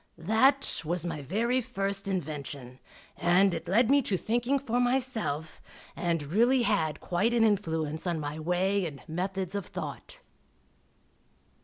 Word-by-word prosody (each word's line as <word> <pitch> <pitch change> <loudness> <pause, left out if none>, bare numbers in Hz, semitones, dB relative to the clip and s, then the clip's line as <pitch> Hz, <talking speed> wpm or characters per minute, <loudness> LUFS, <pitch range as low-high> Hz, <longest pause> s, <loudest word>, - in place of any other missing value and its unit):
That 255 - +3
was 170 +2 -1
my 160 -4 -3
very 230 - 0
first 195 -2 -3
invention, 145 -8 -5 0.4
and 180 +2 +3
it 165 -1 -5
led 225 +6 +3
me 285 0 +5
to 200 -7 -1
thinking 240 +7 0
for 245 -3 -1
myself, 245 - -1 0.3
and 170 -3 -1
really 235 - +3
had 160 -9 0
quite 210 +7 0
an 230 - +4
influence 160 -6 0
on 170 -2 0
my 150 +1 -4
way 180 +3 +1
and 140 -3 -9
methods 185 +2 -3
of 200 -2 -3
thought. - - -7
190 Hz, 140 wpm, -29 LUFS, 160-230 Hz, 0.4 s, me